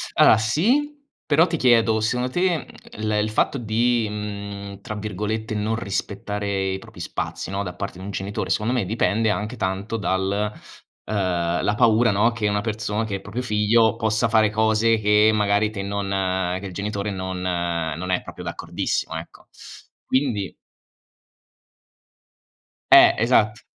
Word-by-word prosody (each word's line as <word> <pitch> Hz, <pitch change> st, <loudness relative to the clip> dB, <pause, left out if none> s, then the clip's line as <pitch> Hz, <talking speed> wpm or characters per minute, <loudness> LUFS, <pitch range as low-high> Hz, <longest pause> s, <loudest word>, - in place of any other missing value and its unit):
Allora, -, -, +7 dB
sì. 225 Hz, -, +1 dB, 0.3 s
Però 155 Hz, +2 st, +4 dB
ti 170 Hz, -2 st, -2 dB
chiedo, 115 Hz, -4 st, +4 dB
secondo 125 Hz, +3 st, 0 dB
te, 175 Hz, +1 st, +1 dB
mhmm, -, -, -8 dB, 0.4 s
il 110 Hz, -, 0 dB
il 105 Hz, 0 st, +1 dB
fatto 110 Hz, +5 st, +1 dB
di, 115 Hz, +1 st, +1 dB
mhmm, 100 Hz, -1 st, -6 dB
tra 110 Hz, -, -6 dB
virgolette 105 Hz, +1 st, -3 dB
"non 110 Hz, +1 st, -1 dB
rispettare" 100 Hz, -1 st, -3 dB
i 95 Hz, -, -4 dB
propri -, -, -14 dB
spazi, -, -, -4 dB
no, 100 Hz, +1 st, -2 dB
da 90 Hz, -, -5 dB
parte 95 Hz, -1 st, -6 dB
di -, -, -9 dB
un -, -, -6 dB
genitore 95 Hz, -1 st, -4 dB
secondo 110 Hz, +5 st, 0 dB
me 120 Hz, -7 st, 0 dB
dipende 110 Hz, +1 st, +1 dB
anche 105 Hz, +3 st, -2 dB
tanto 95 Hz, +2 st, -2 dB
dal 100 Hz, +1 st, -1 dB, 0.5 s
uhm, -, -, -5 dB, 0.5 s
la 105 Hz, -, +1 dB
paura, 115 Hz, -1 st, +4 dB
no, 105 Hz, +4 st, +3 dB
che 115 Hz, -2 st, -1 dB
una 105 Hz, 0 st, 0 dB
person 110 Hz, 0 st, -2 dB
che 105 Hz, -, -5 dB
il 95 Hz, -, -5 dB
proprio 105 Hz, +6 st, -5 dB
figlio 110 Hz, 0 st, +3 dB
possa 110 Hz, 0 st, +1 dB
fare 110 Hz, -2 st, +3 dB
cose 110 Hz, +1 st, +2 dB
che 105 Hz, +1 st, +4 dB
magari 105 Hz, 0 st, +2 dB
te 100 Hz, -2 st, -5 dB
non 95 Hz, -2 st, -1 dB
che 100 Hz, -, -9 dB
il 95 Hz, -, -7 dB
genitore 100 Hz, +1 st, -3 dB
non 95 Hz, -1 st, -4 dB
non 85 Hz, -1 st, -2 dB
è 90 Hz, -, +1 dB
proprio -, -, -9 dB
d'accordissimo, -, -, -3 dB
ecco. -, -, -9 dB, 0.6 s
Quindi 115 Hz, -, -1 dB, 2.4 s
Eh, -, -, +9 dB
esatt 110 Hz, -1 st, +2 dB
105 Hz, 155 wpm, -23 LUFS, 100-115 Hz, 2.4 s, Eh